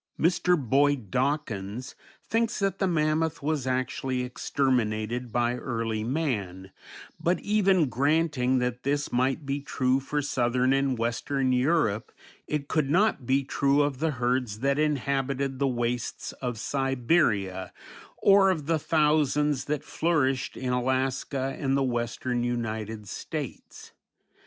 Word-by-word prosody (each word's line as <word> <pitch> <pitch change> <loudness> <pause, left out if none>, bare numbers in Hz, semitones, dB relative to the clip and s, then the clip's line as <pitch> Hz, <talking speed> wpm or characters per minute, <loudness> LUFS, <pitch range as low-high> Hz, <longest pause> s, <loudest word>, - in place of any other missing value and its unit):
Mr. 175 +1 +3
Boyd 135 -4 +1
Dawkins 125 -4 -2 0.3
thinks 230 +1 0
that 195 -1 -1
the 195 - +2
mammoth 155 -2 0
was 145 -3 -1
actually 130 0 -1
exterminated 125 -2 -1
by 120 +1 +1
early 115 -3 -2
man, 105 - -2 0.5
but, 175 +2 +1
even 195 -6 +3
granting 135 0 +1
that 125 0 -1
this 145 +1 -1
might 130 +4 0
be 140 +1 -2
true 130 -2 +1
for 145 +2 -2
southern 130 -2 +1
and 135 -2 +1
western 130 +3 0
Europe, 125 -5 +1 0.4
it 150 -2 -2
could 150 -3 0
not 175 - +2
be 135 +1 +2
true 140 +1 +2
of 140 -3 -2
the 160 +2 +1
herds 120 -3 -1
that 140 +1 +1
inhabited 140 -2 0
the 140 - +2
wastes 120 -1 -2
of 125 -3 -3
Siberia, 120 - 0 0.5
or 195 -1 +5
of 160 -6 -1
the 160 +1 +1
thousands 150 -2 +2
that 150 0 -2
flourished 140 -7 0
in 125 -1 -2
Alaska 130 +1 -1
and 135 -1 +1
the 135 - +2
western 120 0 -1
United 110 -3 -3
States. - - -7
135 Hz, 130 wpm, -27 LUFS, 120-150 Hz, 0.5 s, or